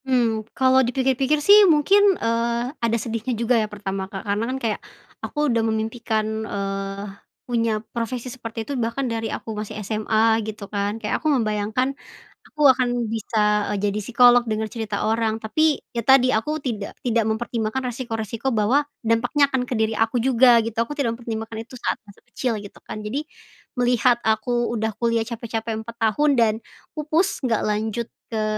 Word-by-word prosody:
Mmm, 230 -4 +1
kalau 260 0 +5
dipikir-pikir 265 +4 +1
sih 415 +1 +9
mungkin, 390 +6 +5
eee, 235 +2 -1
ada 230 0 +1
sedihnya 230 +1 -3
juga 235 +2 +1
ya 215 - -2
pertama 195 -2 -5
Kak 195 -1 -7
karena 205 +2 0
kan 260 - -2
kayak, 225 -5 -2 0.4
aku 295 0 -2
udah 230 - +2
memimpikan, 220 0 -1 0.2
eee, 195 -1 -4 0.4
punya 230 -4 0
profesi 240 +1 -3
seperti 230 -2 -6
itu 285 - -4
bahkan 230 +4 -1
dari 225 -2 -2
aku 225 - -5
masih 210 0 -5
SMA 220 +1 +2
gitu 215 -1 -6
kan, 205 +1 -1
kayak 215 -2 -2
aku 310 - -2
membayangkan, 225 0 0 0.5
aku 300 - -9
akan 245 -2 0
bisa, 210 -1 +1
eee, 205 - -1
jadi 205 +1 -2
psikolog 245 +3 +5
denger 215 0 -1
cerita 215 -3 -3
orang 220 0 +1
tapi, 295 +8 +1 0.2
ya 235 - -1
tadi 255 +1 +5
aku 300 +8 0
tidak 235 -9 -5
tidak 235 -1 +2
mempertimbangkan 230 +2 -2
resiko-resiko 230 0 -3
bahwa 230 +4 +2 0.2
dampaknya 245 +6 +2
akan 250 -1 0
ke 245 - -1
diri 220 0 +1
aku 225 +3 +1
juga 245 0 +5
gitu 230 0 -5
aku 295 +6 -4
tidak 245 -6 0
mempertimbangkan 225 -1 -5
itu 245 +3 -11
saat - - -2
masa 200 - -18
kecil 245 -4 -1
gitu 205 -1 -10
kan, 215 0 -6
jadi, 255 +8 -2 0.6
melihat 245 0 +3
aku 240 +2 +1
udah 220 0 -1
kuliah 230 -1 +1
capek-capek 225 -1 -4
4 235 0 -8
tahun 285 +7 +3
dan 230 -3 +4 0.4
pupus, 315 +5 0
nggak 230 -3 +1
lanjut 215 +2 -1 0.2
ke 220 -1 -1
230 Hz, 170 wpm, -23 LUFS, 220-250 Hz, 0.6 s, sih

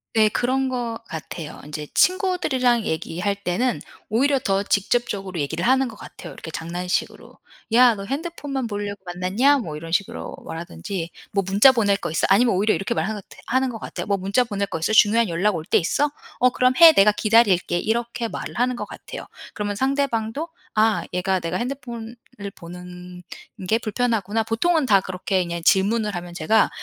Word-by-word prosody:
네. 215 -1 +5
그런 260 +4 0
것 240 -3 -3
같아요. 160 -1 -7
인제 150 0 -6
친구들이랑 305 - +2
얘기할 180 +2 -2
때는 200 +6 -1 0.3
오히려 275 +5 +2
더 195 -6 0
직접적으로 200 -3 -1
얘기를 160 +4 -2
하는 265 0 +3
것 225 - -9
같아요. - - -11
이렇게 160 - -9
장난식으로. 175 +3 -4 0.4
"야 240 -1 +6
너 195 - -7
핸드폰만 275 - -4
보려고 205 -1 -5
만났냐?" 190 +11 +2
뭐 165 - -5
이런 165 +2 -8
식으로 185 +3 -2
말하든지 165 - -5 0.2
"뭐 195 -1 +1
문자 205 +8 +7
보낼 205 -5 +2
거 175 - -5
있어?" 160 - +1
아니면 230 +4 +4
오히려 205 +4 +2
이렇게 195 +5 -2
말하는 215 -3 -2 0.3
하는 260 +1 +1
것 225 -3 -6
같아요. - - -6
"뭐 200 -1 0
문자 195 +7 +1
보낼 200 -4 -3
거 165 - -4
있어? 165 +7 -1
중요한 220 0 +5
연락 185 +4 +1
올 160 - -4
때 - - +3
있어? 285 - 0 0.3
어 250 - +5
그럼 255 0 +2
해. 335 -1 +10
내가 205 +2 +6
기다릴게." 205 -5 +3
이렇게 235 +2 -2
말을 - - -6
하는 250 0 +1
것 - - -5
같아요. - - -9 0.3
그러면 205 -1 -3
상대방도 265 +2 -1 0.3
'아 215 0 +3
얘가 185 +1 0
내가 165 0 -3
핸드폰을 240 -2 -5 0.4
보는 180 +1 -10 0.4
게 225 +3 +2
불편하구나.' 225 -2 -1
보통은 290 +8 +1
다 200 -5 +4
그렇게 185 +1 -1
그냥 170 -1 -5
질문을 210 +3 +2
하면 175 0 -6
제가 210 +7 +3
210 Hz, 380 characters per minute, -23 LUFS, 180-245 Hz, 0.4 s, 해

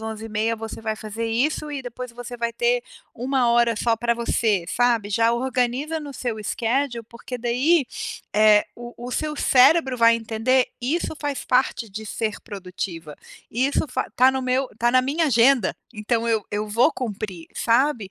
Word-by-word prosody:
11h30, 220 0 -3
você - - -8
vai 220 -1 -3
fazer 220 +2 -5
isso, 285 +6 -1
e 280 -2 -4
depois 250 0 -7
você 245 0 -8
vai 235 0 -1
ter 485 0 +1 0.3
1 255 0 0
hora 235 -1 +3
só 230 +2 +1
para 235 +1 0
você, 220 -5 0
sabe. 235 -3 +1
Já 230 +2 +3
organiza 260 +5 -1
no 290 -2 -8
seu 240 -3 -3
schedule, 235 +2 -1
porque 235 +2 -7
daí, 255 +7 +2 0.5
eh, 210 -1 +6
o 240 0 -10
o - - -6
seu 305 -1 -3
cérebro 265 0 +4
vai 230 0 +5
entender: 230 +3 +1
"Isso 315 +6 -1
faz 290 -2 -3
parte 250 -3 +1
de 215 +2 -7
ser 215 -1 -3
produtiva. 180 -5 -7 0.4
Isso 265 +7 +1
fa - - -2
está 255 +1 +4
no 265 - -2
meu 255 +1 0
tá 240 +1 +3
na 255 - +5
minha 300 +5 0
agenda. 240 -4 +3 0.2
Então 225 +2 -1
eu 220 -2 +1
eu 210 +1 -1
vou 245 +8 +3
cumprir", 205 -9 -5
sabe? 235 -4 +1
235 Hz, 170 wpm, -23 LUFS, 220-260 Hz, 0.5 s, eh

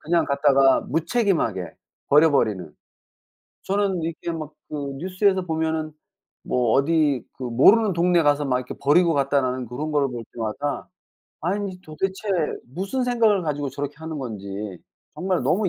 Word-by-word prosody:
그냥 170 +2 +1
갖다가 140 -1 +4
무책임하게 160 - 0 0.3
버려 150 +3 +6
버리는. 105 - 0 0.9
저는 195 -3 0
이렇게 165 +1 -4
막 155 -2 -5 0.2
그 - - -8 0.2
뉴스에서 185 +3 +1
보면은 160 -1 -1 0.5
뭐 120 -3 +1
어디 145 -2 +2
그 - - -12
"모르는 195 - +5
동네 175 0 +3
가서 145 -1 +2
막 130 -2 +1
이렇게 125 0 -6
버리고 165 +4 +4
갔다."라는 135 -3 0
그런 140 +7 -4
거를 145 -2 +2
볼 120 -2 -6
때마다 120 +6 -3 0.6
아니 190 +1 -2
도대체 190 +6 -4 0.5
무슨 200 - -2
생각을 225 -6 +3
가지고 145 -2 -2
저렇게 145 +2 -5
하는 160 -1 -6
건지 100 -5 -6 0.4
정말 185 -5 -1
너무 185 +9 +2
155 Hz, 320 characters per minute, -23 LUFS, 135-180 Hz, 0.9 s, 버려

